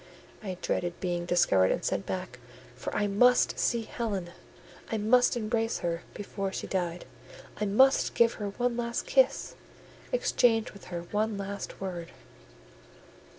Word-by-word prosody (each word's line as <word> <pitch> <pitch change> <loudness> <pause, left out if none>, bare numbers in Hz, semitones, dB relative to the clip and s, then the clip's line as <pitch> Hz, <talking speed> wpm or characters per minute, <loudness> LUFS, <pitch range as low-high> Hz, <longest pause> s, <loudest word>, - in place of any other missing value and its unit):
I 190 -4 -5
dreaded 175 -1 -1
being 175 -1 -2
discovered 95 - +4
and - - -1
sent 100 - -1
back; 185 -9 -4 0.4
for 125 - -5
I 210 - +2
must 245 +5 +4
see 235 -2 +1
Helen,—I 200 -1 -6
must 245 +4 +4
embrace 225 0 0
her 170 0 -1
before 195 -1 -4
she - - -4
died,—I 190 - -5
must 260 +7 +4
give 235 0 +4
her 205 - -1
one 245 +4 -1
last 235 0 -2
kiss, - - +2 0.6
exchange 245 - +2
with 200 - -13
her 175 -1 -5
one 215 0 0
last 200 0 -6
word. 180 -3 -5
205 Hz, 135 wpm, -29 LUFS, 180-235 Hz, 0.6 s, discovered